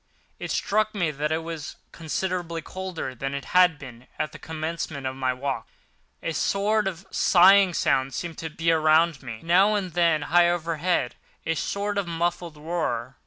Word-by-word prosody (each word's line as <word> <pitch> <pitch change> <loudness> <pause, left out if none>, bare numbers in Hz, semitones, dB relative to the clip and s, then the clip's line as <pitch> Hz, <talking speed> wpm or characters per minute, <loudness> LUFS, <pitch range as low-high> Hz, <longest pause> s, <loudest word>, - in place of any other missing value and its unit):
It - - -5
struck 215 +1 0
me 175 -6 0
that 150 +1 -2
it 160 +1 -1
was 165 -3 -6 0.2
considerably 170 0 -3
colder 185 -8 -5
than 135 +3 -4
it 140 -1 -5
had 180 -3 +5
been 125 -2 -12
at 155 - -2
the - - -11
commencement 160 -3 -5
of 130 0 -3
my 130 -1 0
walk—a 135 +5 -7
sort 205 +4 +1
of 190 0 -5
sighing 190 0 +5
sound 130 -1 +1
seemed 170 -2 -5
to 160 - -4
be 165 +2 0
around 160 -1 +3
me, 115 -4 -6
with, 110 - -15
now 190 +5 +4
and 185 -5 -3
then, 165 -3 +2
high 175 +2 +4
overhead, 170 -4 -1 0.3
a 165 - +1
sort 200 +4 -2
of 195 - -3
muffled 170 -1 -2
roar. 150 -6 -3
165 Hz, 170 wpm, -25 LUFS, 150-180 Hz, 0.3 s, had